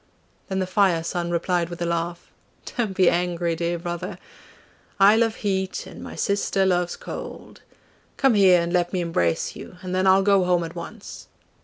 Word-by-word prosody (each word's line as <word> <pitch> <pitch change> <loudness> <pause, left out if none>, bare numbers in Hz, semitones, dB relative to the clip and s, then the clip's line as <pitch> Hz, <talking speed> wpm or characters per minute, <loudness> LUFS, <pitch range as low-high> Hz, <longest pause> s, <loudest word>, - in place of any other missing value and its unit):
Then 190 - -2
the 190 - 0
Fire 185 -3 +2
son 170 +1 -3
replied 175 0 0
with 175 - -8
a 175 - -1
laugh, 170 +1 -3 0.4
'Don't 215 -6 -2
be 185 -2 +5
angry, 175 -1 +1
dear 170 +1 -1
brother! 175 0 -5 0.8
I 200 +2 +7
love 225 -1 +2
heat 190 -2 -2
and - - -11
my - - -8
sister 200 -1 0
loves 175 -2 +1
cold - - -9 0.6
come 270 -3 +4
here 190 -4 +6
and 170 +1 -2
let 175 0 +1
me 185 - 0
embrace 125 - 0
you, 180 - -10
and 185 0 -4
then 185 +1 +1
I'll 190 +1 +5
go 200 -1 +4
home 180 -1 +2
at 165 0 -6
once. 195 +5 -9
180 Hz, 180 wpm, -24 LUFS, 170-195 Hz, 0.8 s, I